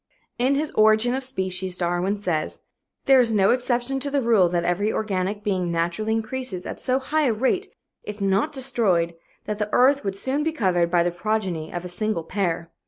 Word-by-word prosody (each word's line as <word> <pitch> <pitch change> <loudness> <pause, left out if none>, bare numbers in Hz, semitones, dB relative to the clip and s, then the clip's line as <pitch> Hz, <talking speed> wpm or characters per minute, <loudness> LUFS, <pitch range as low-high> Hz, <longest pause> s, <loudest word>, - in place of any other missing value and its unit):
In 260 +3 +2
his 300 +2 -1
Origin 220 +3 +4
of 265 - -1
Species, 190 -7 -2
Darwin 175 +3 0
says: 170 -6 -2 0.4
"There 270 -1 +6
is 235 -2 +3
no 200 -3 +4
exception 250 +1 0
to 280 +2 -3
the 280 -1 0
rule 215 -7 +4
that 170 -1 0
every 190 +5 0
organic 205 0 -2
being 185 -4 -1
naturally 170 +6 -1
increases 225 -4 -4
at - - -6
so 255 0 +1
high 295 +3 0
a 235 - +2
rate, 265 - -1 0.3
if 210 0 -8
not 200 +8 +1
destroyed, 210 - +1 0.3
that 210 0 -4
the 210 0 -1
earth 275 +3 +4
would 195 -1 -3
soon 265 +7 -1
be 320 +1 -1
covered 180 - +1
by 175 -1 +3
the 175 - 0
progeny 180 -4 -2
of 175 0 -5
a - - -3
single 180 -1 -2
pair." 170 -2 -2
210 Hz, 195 wpm, -23 LUFS, 180-250 Hz, 0.4 s, There